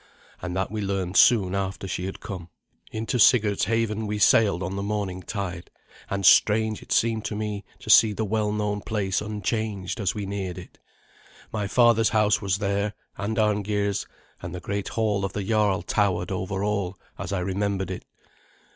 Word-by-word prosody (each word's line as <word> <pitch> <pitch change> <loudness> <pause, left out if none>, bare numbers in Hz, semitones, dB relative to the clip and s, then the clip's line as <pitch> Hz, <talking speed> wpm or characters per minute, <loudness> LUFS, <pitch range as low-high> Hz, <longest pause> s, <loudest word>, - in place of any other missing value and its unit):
And 90 0 -4
that 95 +1 -1
we 110 -1 -3
learned 95 -2 -2
soon 95 -2 +5
after 95 0 -3
she 90 -1 -3
had 95 - -7
come. 90 -3 -7 0.4
Into 115 +3 -2
Sigurd's 105 -3 +4
haven 110 0 0
we 105 0 -2
sailed 100 -3 +4
on 95 +2 -3
the 100 - -3
morning 100 -3 -3
tide, 90 -4 -5 0.4
and 100 -1 -2
strange 110 +3 +5
it - - -14
seemed 115 -1 +2
to 105 - -3
me 105 -1 -3
to - - -2
see 110 - +7
the 110 +2 -2
well 105 0 0
known 105 -1 -1
place 100 -4 -1
unchanged 105 -1 -3
as 100 -3 0
we 105 -1 -3
neared 95 -2 -4
it. 90 - -11 0.7
My 105 -2 -1
father's 115 0 +4
house 105 -1 +2
was 100 -2 0
there, 100 0 -1 0.2
and 105 +3 -3
Arngeir's, 105 -1 0 0.3
and 85 0 -6
the - - -4
great 100 +3 -3
hall 105 -3 0
of 95 0 -2
the 100 - -3
jarl 100 -3 +1
towered 95 0 0
over 95 +1 -2
all, 100 -3 -1 0.2
as 85 - -5
I 95 -2 -1
remembered 95 +1 -1
it. 90 - -6
100 Hz, 180 wpm, -25 LUFS, 95-105 Hz, 0.7 s, see